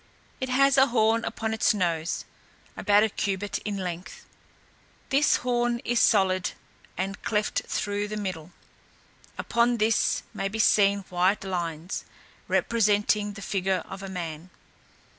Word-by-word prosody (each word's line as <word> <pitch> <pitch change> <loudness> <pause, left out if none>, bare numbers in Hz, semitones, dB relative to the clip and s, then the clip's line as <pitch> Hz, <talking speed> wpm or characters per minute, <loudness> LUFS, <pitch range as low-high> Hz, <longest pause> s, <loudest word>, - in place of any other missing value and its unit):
It 260 - -3
has 275 +1 +4
a 265 - +6
horn 225 -1 +2
upon 220 0 -3
its 220 -1 +2
nose, 170 -4 -1 0.5
about 205 0 +4
a 220 - +2
cubit 200 0 -2
in 205 -2 -4
length; 180 -1 -6 0.8
this 280 +2 +4
horn 240 -1 0
is 240 0 +1
solid, 190 -3 +3 0.4
and 195 +2 -3
cleft 210 -1 0
through 205 0 -2
the 215 0 -5
middle, 185 -5 -5 0.9
upon 235 +1 +1
this 220 0 +2
may 195 - -2
be 205 +3 -5
seen 200 -2 +4
white 185 +3 +1
lines, 170 -2 -4 0.4
representing 210 -2 +1
the 200 -1 -9
figure 190 -2 -1
of 190 0 -8
a 195 - -6
man. 170 -2 -6
205 Hz, 135 wpm, -26 LUFS, 185-225 Hz, 0.9 s, a